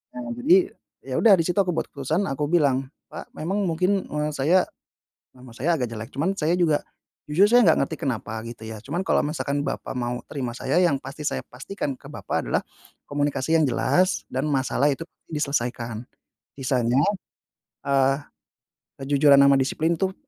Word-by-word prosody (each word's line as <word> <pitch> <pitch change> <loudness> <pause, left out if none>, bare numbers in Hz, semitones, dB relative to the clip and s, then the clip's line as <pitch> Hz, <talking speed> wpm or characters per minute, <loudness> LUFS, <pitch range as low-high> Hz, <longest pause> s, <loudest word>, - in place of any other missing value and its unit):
Nah, 120 -1 -5
jadi 180 +8 +4 0.3
ya 130 -1 -4
udah 225 -3 +7
di - - +3
situ 180 +3 -2
aku 190 - +2
buat - - -2
keputusan, 155 +7 -1
aku 145 +2 -1
bilang, 135 -5 +2 0.2
"Pak, - - -9
memang 195 +6 -1
mungkin, 185 +4 +1
eee, 150 0 -2
saya 175 +7 +3 0.7
nama 125 0 -14
saya 165 +9 +1
agak 125 -4 -2
jelek 110 0 -6
cuman 160 +8 0
saya 160 +2 +1
juga 160 -4 +2 0.5
jujur 170 +7 +4
saya 245 +1 +6
nggak 160 - +5
ngerti - - -6
kenapa 110 -3 -3
gitu 115 -1 -9
ya, 110 - -6
cuman 165 +9 -3
kalau - - +3
misalkan 145 -1 -2
Bapak - - -4
mau 120 0 -2
terima 130 -5 -3
saya 135 +6 -1
yang 165 -7 +3
pasti 140 +3 -8
saya - - -1
pastikan 135 +1 -5
ke - - -13
Bapak - - -3
adalah - - +1 0.5
komunikasi 145 +1 0
yang 160 - +3
jelas 185 +9 +1
dan 130 +2 -2
masalah 140 0 +1
itu 140 +4 -4 0.3
diselesaikan. 120 -6 -2 0.5
Sisanya, 125 -1 +1 0.9
eee, 135 -1 +3 0.9
kejujuran 140 +1 +5
ama 140 0 +6
disiplin 160 +5 0
tuh 190 0 -1
140 Hz, 170 wpm, -24 LUFS, 130-165 Hz, 0.9 s, udah